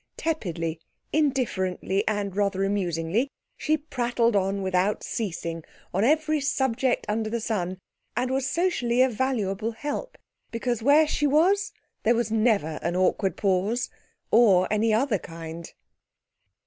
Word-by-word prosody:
Tepidly, 170 - -2 0.3
indifferently 210 - 0
and 205 -3 -1
rather 200 -1 +1
amusingly 195 - 0 0.3
she 310 +1 +1
prattled 240 -6 0
on 195 0 0
without 190 +2 +1
ceasing, 165 -6 -4 0.3
on 195 +3 +1
every 305 +3 +2
subject 265 -2 0
under 215 +1 -1
the 235 +1 -1
sun, 190 -5 -2 0.4
and 250 +1 0
was 265 0 0
socially 255 -9 +2
a 260 - +3
valuable 225 -3 -1
help 290 - -5 0.3
because 235 0 -2
where 290 +6 +5
she 295 0 +1
was 385 +8 +3 0.3
there 235 +2 +3
was 230 -1 -1
never 215 -9 +1
an 170 +1 -1
awkward 185 +1 +1
pause 200 +5 0 0.4
or 200 -6 +5
any 220 +1 +2
other 220 -1 +2
kind. 165 0 -8
220 Hz, 130 wpm, -26 LUFS, 190-260 Hz, 0.4 s, where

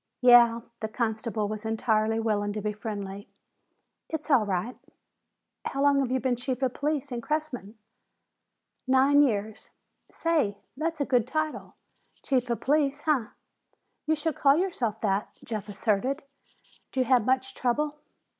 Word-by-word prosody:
"Yeah," 240 -2 +7 0.2
the 220 - -2
constable 220 -1 -2
was 215 +1 -5
entirely 220 0 +1
willing 205 -2 0
to 210 - -4
be 210 0 -1
friendly, 205 -2 -6 0.8
"it's 315 -1 -4
all 235 -7 +4
right." 200 +6 -2 0.9
"How 275 +1 -1
long 285 -1 +4
have 270 -3 0
you 260 - +2
been 255 -1 0
chief 255 +1 -3
of 255 -2 +1
police 290 -1 -2
in 240 -1 -3
Cressman?" 250 -7 -3 1.1
"Nine 270 +2 +5
years. 220 -5 -1 0.4
Say! 305 -12 0 0.2
That's 315 +1 -2
a - - +2
good 245 -3 +2
title! 310 +2 -3 0.5
Chief 255 -3 0
of 235 - -1
Police, 290 0 +1
huh?" 285 -8 +1 0.8
"You 315 - +3
should 310 -1 -2
call 280 +1 +5
yourself 255 - -1
that," 200 -1 0 0.2
Jeff 215 -2 -5
asserted. 220 +8 0 0.7
"Do 260 - 0
you - - +1
have 250 -3 +4
much 260 +2 0
trouble?" 295 +5 -1
250 Hz, 145 wpm, -27 LUFS, 220-285 Hz, 1.1 s, Yeah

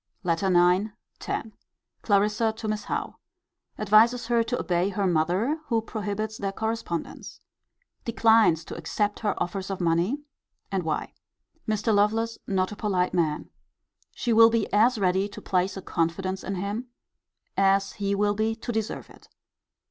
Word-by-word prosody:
LETTER 170 +1 0 0.2
IX. 195 +4 0 0.4
X. 220 - -2 0.5
Clarissa 210 +2 +2
to 220 0 -6
Miss 210 -1 -2
Howe. - - -3 0.6
Advises 225 +4 +4
her 235 -1 +3
to 240 +2 -2
obey 175 +2 +1
her 200 0 -1
mother, 180 - +1
who 230 -2 +2
prohibits 215 0 -4
their 195 -1 -2
correspondence. 220 -6 -4 0.6
Declines 220 -8 +4
to - - -7
accept 205 -1 -2
her 210 -3 0
offers 190 +2 -3
of 195 - -3
money: 175 - +1 0.5
and 195 -1 0
why. 160 -2 -3 0.5
Mr. 215 +1 +1
Lovelace 220 +3 +1
not 185 -1 0
a - - -6
polite 185 -4 0
man. 160 -4 -1 0.6
She 240 - 0
will 225 +1 +8
be 230 -2 +1
as 230 +4 +4
ready 190 0 +1
to 205 - -9
place 185 +1 0
a 190 - -7
confidence 185 +3 -2
in 195 - -3
him, 205 +6 -3 0.7
as 195 0 +2
he 200 -1 -1
will 205 +1 +2
be 220 +2 0
to 230 +2 -5
deserve 220 -1 -3
it. - - -18
205 Hz, 150 wpm, -26 LUFS, 185-220 Hz, 0.7 s, will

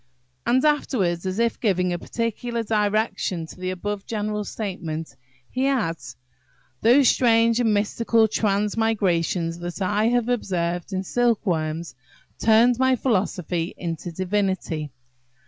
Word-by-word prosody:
And 260 +4 +3
afterwards, 195 - +1
as 185 +1 -3
if 235 0 +1
giving 180 -5 +1
a 175 - -3
particular 230 +2 -3
direction 210 -5 0
to 160 - -13
the 185 0 -3
above 195 +2 -4
general 210 -1 -2
statement, 175 -7 -5 0.4
he 260 +2 0
adds: 165 - -2 0.7
"Those 250 +4 +5
strange 230 -1 +4
and 230 -3 +2
mystical 220 +2 +2
transmigrations 200 -6 0
that 175 +2 -6
I 205 +3 +1
have 240 0 +2
observed 175 -7 -1
in 190 0 -2
silkworms 175 -8 0 0.5
turned 230 +2 +4
my 260 0 +4
philosophy 185 - -1
into 170 0 -4
divinity. 185 -4 -1
205 Hz, 120 wpm, -24 LUFS, 175-230 Hz, 0.7 s, Those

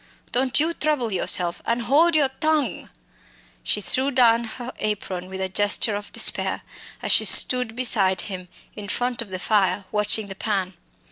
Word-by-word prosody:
Don't 255 +2 0
you 325 +3 0
trouble 295 -8 -1
yourself 175 -1 -1
an' 235 +1 -2
hold 305 +8 +2
your 290 -3 +3
tongue!" 310 -2 -1 0.7
She 210 - -2
threw 260 +9 +1
down 235 -3 +3
her 245 +2 -8
apron 190 -4 -4
with 190 0 -8
a 190 - -2
gesture 205 +2 0
of 205 0 -8
despair - - +1 0.4
as - - -2
she - - +4
stood 250 -3 +5
beside 210 -7 +3
him, 185 -3 -8 0.3
in 210 -1 -8
front 245 +3 -2
of 225 - -9
the 185 - -5
fire, 200 0 0
watching 210 +1 0
the 195 - -8
pan. 195 -2 -3
220 Hz, 165 wpm, -22 LUFS, 195-255 Hz, 0.7 s, stood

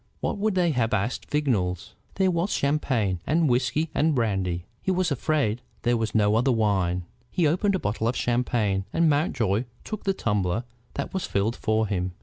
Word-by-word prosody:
What - - -2
would 210 -1 +1
they 175 -2 +3
have, 115 -5 +1
asked 110 +5 -2
Vignolles. 105 - 0 0.2
There 190 -1 +3
was 170 +3 0
champagne, 125 - +1
and 160 +2 +3
whiskey, 130 +5 +1
and 155 0 +2
brandy. 95 -7 0 0.2
He - - -2
was 185 -2 +1
afraid 135 -5 0 0.2
there 120 0 +3
was 115 -1 -2
no 105 -1 +4
other 125 +4 +3
wine. 95 -6 +1 0.2
He 180 -3 +1
opened 185 +6 +2
a - - 0
bottle 110 -4 -1
of 120 - 0
champagne, 115 -5 0
and 165 0 +3
Mountjoy 120 - +1 0.2
took 215 -1 -6
the 195 -1 +1
tumbler 105 - 0 0.3
that - - -4
was 190 - -2
filled 105 +4 0
for 110 -1 +1
him. 90 -3 -2
120 Hz, 180 wpm, -26 LUFS, 105-155 Hz, 0.3 s, no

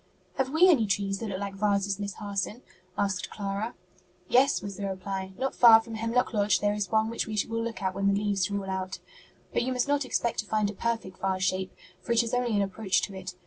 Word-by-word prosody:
'" - - -37
"Have 265 -1 +1
we 320 +6 +5
any 265 - +4
trees 195 0 0
that 225 - -4
look 190 -1 -3
like 200 -1 -4
vases, 200 0 0
Miss 200 -1 -4
Harson?" 205 +3 -4 0.3
asked 195 -2 -1
Clara. 205 +3 -4 0.5
"Yes," 270 +6 +4
was 200 -1 -6
the 200 +1 -3
reply; 190 0 -4
"not 265 +1 -1
far 230 -2 +8
from 225 0 -9
Hemlock 230 +2 0
Lodge 205 -3 +3
there 205 0 +1
is 205 -3 -2
one 220 0 +2
which 230 - -2
we 215 -1 -4
will 230 0 -2
look 230 -3 -5
at 190 -1 0
when 195 +1 0
the 200 - +1
leaves 205 -2 0
are 200 - -1
all 195 - -7
out. 190 0 -3 0.6
But - - +2
you 255 +2 -1
must 250 +1 0
not 285 0 +2
expect 240 -2 -1
to 210 - -2
find 215 -1 +1
a - - -10
perfect 225 -3 -3
vase 190 -1 -1
shape, 185 0 0 0.3
for 235 - -1
it 235 0 +4
is 230 - -5
only 245 -3 +1
an 200 - +3
approach 195 0 0
to 200 - -3
it. 185 -1 -7
205 Hz, 245 wpm, -28 LUFS, 195-230 Hz, 0.6 s, far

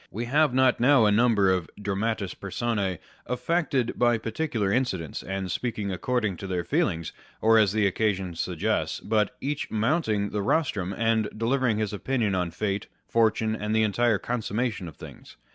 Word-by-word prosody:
We 115 +3 -4
have 150 +4 +3
not 130 0 +3
now 125 -1 +5
a 105 - +4
number 105 -3 +4
of 90 -3 -1
dramatis 105 -1 -2
personce 100 -2 -2 0.3
affected 130 +1 -1
by 120 -1 +4
particular 110 -2 -2
incidents 95 - -1
and 95 -1 -4
speaking 105 0 -2
according 105 -1 -1
to 95 - -7
their 90 -2 -1
feelings, 95 - -1 0.3
or 115 0 +5
as 105 -3 +4
the 105 0 +1
occasion 95 -2 0
suggests, 85 0 -1
but 105 -2 0
each 145 +1 -3
mounting 110 - 0
the 105 - -1
rostrum, 100 - 0
and 110 +1 +1
delivering 120 0 +1
his 105 -1 -2
opinion 110 -1 -1
on 90 -2 0
fate, 100 +3 -3 0.2
fortune, 110 -1 +2
and 105 0 -2
the 110 - +4
entire 110 +1 +2
consummation 110 -3 -2
of 80 - -10
things. - - -12
110 Hz, 160 wpm, -26 LUFS, 100-120 Hz, 0.3 s, now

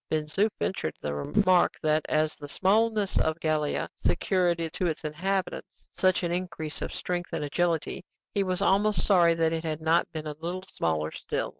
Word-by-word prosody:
Ben 155 -1 0
Zoof 195 +9 +1
ventured 125 - -2
the 75 - -3
remark 180 - +3
that, 155 0 +2
as 155 0 +1
the 145 - -9
smallness 210 +4 +2
of 160 +1 0
Gallia 155 -2 0 0.2
secured 180 -3 +2 0.2
to 180 - 0
its 160 -1 -3
inhabitants 185 +5 -3
such 185 +1 +2
an 170 - 0
increase 170 -3 -4
of - - -3
strength 175 -1 -3
and - - -1
agility, 165 +2 -1 0.3
he 200 - +1
was 185 -2 -1
almost 200 -1 +2
sorry 175 -4 +5
that 165 0 +1
it 165 0 -2
had 155 -2 -2
not 160 +2 +2
been 155 -2 -5
a 150 - -4
little 180 +3 -3
smaller 80 -1 0
still. - - -3
170 Hz, 180 wpm, -28 LUFS, 155-185 Hz, 0.3 s, sorry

